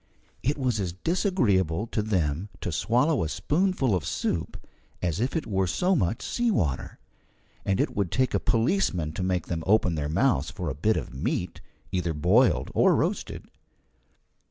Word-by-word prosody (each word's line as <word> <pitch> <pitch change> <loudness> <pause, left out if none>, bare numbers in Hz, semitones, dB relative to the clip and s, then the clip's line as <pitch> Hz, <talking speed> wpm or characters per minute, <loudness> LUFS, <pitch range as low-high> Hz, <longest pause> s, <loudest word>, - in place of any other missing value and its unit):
It 145 +4 0
was 125 -5 0
as 90 -4 -2
disagreeable 105 - +1
to 110 - -2
them 90 -3 -1
to - - -3
swallow 125 - +2
a 80 - -2
spoonful 150 - +1
of 90 -5 0
soup - - -2 0.4
as 85 -1 -1
if 125 +7 -1
it 160 - -1
were 95 -3 0
so 180 - +1
much 105 - 0
sea 240 -1 0
water, 75 - -1 0.7
and 95 -1 +1
it - - 0
would 100 -4 0
take 130 -1 +1
a - - +2
policeman 115 - +1
to 80 - -5
make 90 -1 0
them 80 -2 -3
open 100 -4 +3
their 75 -2 -2
mouths 125 - +2
for 85 -5 -4
a - - -3
bit 105 +10 +1
of - - -5
meat, 65 - -3 0.3
either 85 -3 -1
boiled 95 - +3
or - - +4
roasted. - - -2
100 Hz, 170 wpm, -26 LUFS, 85-130 Hz, 0.7 s, or